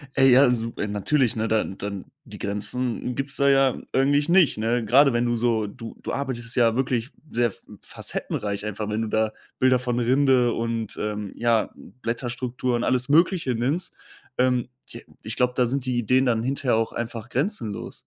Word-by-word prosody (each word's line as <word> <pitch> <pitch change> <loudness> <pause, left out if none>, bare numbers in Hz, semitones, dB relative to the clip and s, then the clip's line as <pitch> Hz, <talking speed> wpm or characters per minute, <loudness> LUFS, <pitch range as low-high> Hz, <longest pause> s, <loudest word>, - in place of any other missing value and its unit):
Ey, 135 0 +5
ja, 130 +1 +6
su 115 -1 -2
äh, 105 - -2
natürlich, 115 +5 +1
ne, 110 +1 0
dann 110 -3 -1
dann 100 -2 -5 0.2
die - - -10
Grenzen 120 +4 -2
gibt's 135 0 0
da 140 -1 +3
ja 135 -2 +4 0.2
eigentlich 145 +2 +2
nicht, 175 - +4
ne? 115 +2 0
Gerade 135 +4 +5
wenn 120 +1 +1
du 120 0 +1
so 115 -2 +1
du 115 +2 -9
du - - -4
arbeitest 130 -3 -3
ja 115 -2 +4
wirklich 125 -1 -1 0.2
sehr 120 0 +2
f 105 - -11 0.2
facettenreich 100 0 -4
einfach, 105 0 -4
wenn 110 +2 -1
du - - -3
da 110 0 0 0.3
Bilder 130 -1 +4
von 125 -1 -1
Rinde 125 -1 +3
und, 115 -2 -3
ähm, 105 -1 -3
ja, 115 -2 +1 0.3
Blätterstrukturen, 120 0 -2
alles 125 +1 +1
Mögliche 165 -4 +3
nimmst. 140 +10 -1 0.4
Ähm, 125 -1 +2 0.2
j - - -9 0.2
ich - - -4
glaube, 125 0 +2
da 125 - +3
sind 130 +2 -2
die 125 -1 -1
Ideen 130 +4 +2
dann 115 -2 +1
hinterher 130 -2 0
auch 115 0 0
einfach 115 0 -5
grenzenlos. 125 - -3
120 Hz, 185 wpm, -24 LUFS, 115-130 Hz, 0.4 s, ja